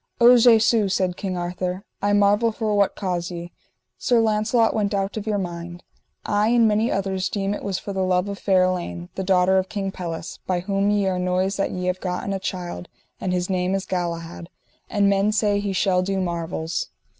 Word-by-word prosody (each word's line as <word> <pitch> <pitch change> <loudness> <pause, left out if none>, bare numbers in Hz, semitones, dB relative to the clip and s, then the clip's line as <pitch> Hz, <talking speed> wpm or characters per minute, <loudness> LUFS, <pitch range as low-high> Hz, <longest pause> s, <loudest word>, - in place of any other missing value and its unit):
O 240 +1 +8
Jesu, 225 -3 +5
said 185 -1 0
King 185 -2 -4
Arthur, 180 +2 -3 0.2
I 205 - +1
marvel 205 +3 +3
for 215 -1 -2
what 200 -1 +2
cause 180 -3 -2
ye, 175 -1 -7 0.5
Sir 245 -3 +3
Launcelot, 220 +1 +2
went 205 -1 0
out 195 0 -1
of 215 0 -5
your 210 -1 +1
mind. 175 -2 -6 0.4
I 205 +1 +2
and 235 -1 +4
many 215 +2 +2
others 190 -1 -1
deem 200 -1 -1
it - - -5
was 195 -2 -2
for 200 - -6
the 190 - -1
love 180 +1 +1
of 200 -1 -5
fair 190 -2 +3
Elaine, 130 - -2
the 190 - -4
daughter 190 0 +3
of 190 0 -3
King 195 -2 -3
Pelles, 170 -3 -6
by 180 -1 0
whom 195 +2 0
ye 205 -1 +2
are 185 -1 0
noised 185 +2 0
that 195 - +1
ye 180 0 -4
have 180 0 -1
gotten 180 +2 -3
a 195 - -2
child, 180 -2 -5 0.3
and 185 - -2
his 180 0 0
name 185 0 0
is 195 - -3
Galahad, 170 -1 -4 0.4
and 205 -2 +2
men 200 +1 +3
say 210 -1 +1
he 200 -1 -2
shall 185 -1 +2
do 195 +1 -1
marvels. 170 -2 -3
190 Hz, 205 wpm, -23 LUFS, 180-205 Hz, 0.5 s, O